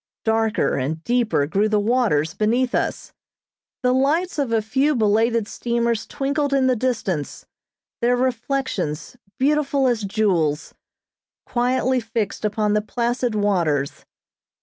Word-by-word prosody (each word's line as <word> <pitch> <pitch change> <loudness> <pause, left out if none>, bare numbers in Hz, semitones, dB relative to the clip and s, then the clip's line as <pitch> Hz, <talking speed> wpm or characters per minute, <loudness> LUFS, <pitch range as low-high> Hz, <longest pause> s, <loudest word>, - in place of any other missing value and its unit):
Darker 220 -1 +1
and 155 +5 -3
deeper 235 -10 +1
grew 200 +8 +1
the 210 -1 +2
waters 205 -9 +1
beneath 240 +5 +1
us. - - -2 0.7
The 250 0 +3
lights 300 +7 +1
of 270 -5 -1
a 225 - +3
few 270 +7 +1
belated 225 0 +2
steamers, 235 -1 -1
twinkled 280 0 -1
in 265 -1 +3
the 255 -1 +3
distance, 220 - -2 0.6
their 245 +1 +3
reflections, 245 - -2 0.2
beautiful 280 0 +1
as 240 -3 +1
jewels, 190 -8 0 0.7
quietly 255 +1 +1
fixed 225 -3 -3
upon 210 0 0
the 210 - +2
placid 240 +1 -1
waters. 170 -9 0
230 Hz, 125 wpm, -22 LUFS, 205-255 Hz, 0.7 s, The